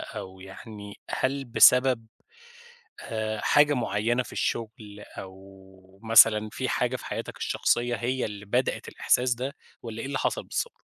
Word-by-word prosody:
أو 95 0 -8
يعني 100 +1 -10 0.2
هل 135 +1 -1
بسبب 125 -1 +5 0.9
آآ 110 -2 -3
حاجة 145 0 +4
معينة 120 +1 0
في - - -13
الشغل 110 -2 -4 0.2
أو 95 0 -13
مثلًا 110 -1 +6
في 130 - -3
حاجة 125 +1 0
في - - -12
حياتك - - -5
الشخصية 120 0 0
هي 125 +2 -2
اللي 105 -1 -6
بدأت 125 +5 -1
الإحساس 125 -1 +1
ده 130 +4 -5 0.3
والّا 115 -1 -7
إيه - - -5
اللي 140 - -3
حصل - - -1
بالضبط؟ 475 - -4
115 Hz, 140 wpm, -26 LUFS, 105-125 Hz, 0.9 s, مثلًا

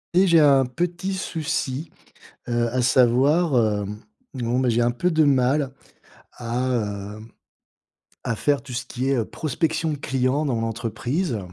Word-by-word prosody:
Et 190 +1 +5
j'ai 170 -2 +6
un 140 -3 +5
petit 175 +7 -3
souci, 155 -4 -3 0.6
heu, 120 0 +1
à 125 +2 0
savoir, 130 +6 +3 0.3
hem, 105 +2 -7 0.3
bon, 125 -1 -1
bah, 130 - +1
j'ai 120 +1 +2
un 120 0 +2
peu 150 +9 0
de 160 -2 +3
mal 135 0 +2 0.6
à 115 -4 -3
heu, - - -11 1.1
à 115 - -1
faire 145 +4 +1
tout 135 -2 -10
ce 120 - -3
qui 130 +1 -3
est 130 -4 +2
prospection 155 +5 -2
de - - -4
clients 135 +2 0
dans 125 -5 0
l'entreprise. 115 - -2
130 Hz, 150 wpm, -23 LUFS, 120-150 Hz, 1.1 s, j'ai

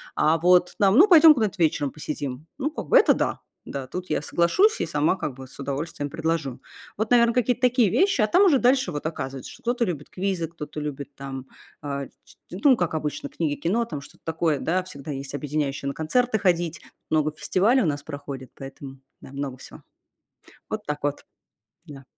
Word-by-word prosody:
а 155 +2 +3
вот 180 +1 +4
там: 200 +3 +4
"Ну, 380 +6 +8
пойдем 325 -4 +9
куда-то 215 -7 -1
вечером 145 -3 +1
посидим". 145 -2 -5
Ну, 295 +2 -2
как - - -6
бы - - +6
это - - +6
да, - - -1 0.3
да, 135 -2 -5
тут 180 +4 -6
я - - 0
соглашусь 370 - +2
и - - +1
сама 150 +5 +1
как 140 -8 -4
бы 130 -1 -10
с 140 - -16
удовольствием 145 +1 -4
предложу. 160 -4 -2 0.4
Вот, 220 +2 -2
наверно, 235 -1 +5
какие-то 250 0 +1
такие 250 -4 +4
вещи, 375 - +2
а 215 - +3
там 360 - +4
уже 300 -7 +5
дальше 260 +2 +3
вот 145 0 -5
оказывается, 135 -5 -5
что - - -14
кто-то 240 0 +1
любит 150 -6 -5
квизы, 185 -3 -2
кто-то 155 -2 -8
любит 145 -1 -6
там, 135 -1 -7 0.4
э, 140 -1 -4 0.2
ч - - -19 0.2
ну, 250 +9 +4
как 175 -4 -1
обычно, 150 -2 -3
книги, 155 -4 -2
кино, 215 +9 0
там 150 -10 -6
что-то - - -16
такое, 160 -3 0
да, 180 +3 0
всегда 150 -4 -8
есть 135 +1 -6
объединяющее- 145 -1 -2
на 140 - -2
концерты 220 - 0
ходить. 175 -4 0 0.3
Много 155 -1 +2
фестивалей 220 +10 +2
у - - 0
нас 145 -2 -1
проходит, 140 -3 -8
поэтому, 135 0 -10 0.2
да, - - -12
много 140 -2 -5
всего. - - -13 0.9
Вот - - -4
так 150 0 -3
вот. 145 0 -2 0.6
Да. 140 -3 -11
160 Hz, 195 wpm, -24 LUFS, 140-210 Hz, 0.9 s, пойдем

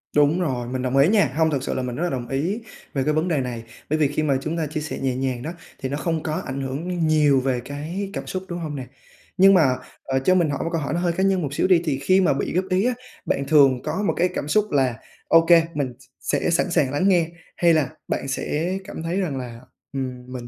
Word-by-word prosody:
Đúng 150 +4 +4
rồi, 125 -8 -2
mình 130 +1 -3
đồng 130 +1 0
ý 140 +3 +6
nha, 200 - +3
hông, 160 0 +3
thực 135 -3 -1
sự - - -2
là 130 - -2
mình 125 -1 -4
rất 160 - -2
là 175 - +1
đồng 125 -4 -4
ý 155 - -1 0.3
về 135 - 0
cái 150 - +1
vấn 155 +3 +1
đề 155 -6 +1
này. 120 -3 -5 0.3
Bởi 155 +1 +1
vì 150 - +4
khi 145 +2 -1
mà 140 -3 +2
chúng 155 +4 -3
ta 160 -2 -1
chia 155 +1 -4
sẻ 150 - -5
nhẹ 130 -2 -1
nhàng 130 -2 -2
đó, 160 - -4 0.3
thì 130 - -3
nó 140 - -2
không 160 0 -2
có 155 0 -2
ảnh 135 0 -4
hưởng 160 +6 -2
nhiều 150 -3 +4
về 130 -1 0
cái 160 +8 -4
cảm - - -5
xúc, 185 0 -4
đúng 175 0 -4
hông 155 -3 -4
nè? 130 -2 -5 0.5
Nhưng 195 +1 +7
mà, 150 -9 +4 0.3
ờ, 135 0 0
cho 185 +8 +3
mình 170 -4 +3
hỏi 140 - -2
một 165 - -2
câu 165 - 0
hỏi 145 - -2
nó 170 - 0
hơi 175 -1 +1
cá 190 - 0
nhân 195 -2 +2
một 145 -2 -3
xíu 145 - +1
đi, 180 -3 +5
thì 140 -3 0
khi 185 +7 +4
mà 180 - +3
bị 135 - -2
góp 185 +1 +1
ý 185 +4 +2
á, 250 - +2 0.3
bạn 140 - -1
thường 140 -4 +5
có 205 - -2
một - - +2
cái 180 +2 +3
cảm - - -3
xúc 210 +7 +1
là 130 -4 +2 0.3
ô 165 0 +6
kê, 165 -1 +7
mình 140 -5 -2
s - - -18
sẽ - - 0
sẵn 170 +1 +1
sàng 140 -6 +2
lắng 145 +7 +1
nghe 170 -4 +3 0.3
hay 170 -1 +4
là 155 -5 +2 0.2
bạn 135 - -2
sẽ 165 +7 -1
cảm 190 -4 -7
thấy 170 +4 -1
rằng 155 -8 -2
là, 120 -2 -6 0.3
ừm, 130 -2 -4
mình 120 -2 -6
150 Hz, 280 wpm, -23 LUFS, 135-175 Hz, 0.5 s, Nhưng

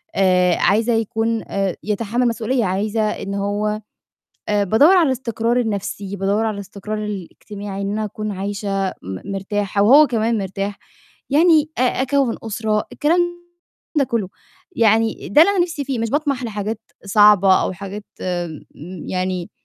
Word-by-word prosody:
آآ، 180 -2 +3
عايزة 225 +4 +2
يكون 225 0 -1
آآ، 195 -3 -1
يتحمَّل 225 +4 0
مسئولية، 230 0 0
عايزة 205 +4 -1
إن 200 -2 -2
هو 210 +2 -1 0.7
آآ، 205 -1 +2
بادوّر 285 - +5
على 340 -4 +5
الاستقرار 240 -2 0
النَفْسي، 200 -2 -3
بادوّر 200 +3 0
على 215 - -1
الاستقرار 205 +2 -6
الاجتماعي، 200 0 -6
إن 200 +1 -2
أنا 215 0 -1
أكون 215 +1 -5
عايشة 195 0 -2
م 95 - -8
مرتاحة 200 +1 -1
وهو 285 +8 +7
كمان 230 -2 0
مرتاح. 195 +1 -4 0.5
يعني 315 0 +4
أ - - +3
أكوِّن 260 0 +1
أسرة، 215 -1 -1
الكلام 330 +4 +2 0.8
ده 275 - +4
كُلّه. 230 -6 -2 0.5
يعني 225 0 +2
ده 295 - +5
اللي 400 - +4
أنا 390 - -1
نِفْسي 320 -5 -5
فيه، 260 -3 -3
مش 230 -1 -2
باطمَح 280 -4 0
لحاجات 215 0 -4 0.2
صعبة 200 -2 +6
أو - - -1
حاجات 200 +2 -7 0.2
م 175 -4 -3 0.5
يعني 185 -1 -2
210 Hz, 145 wpm, -20 LUFS, 195-235 Hz, 0.8 s, وهو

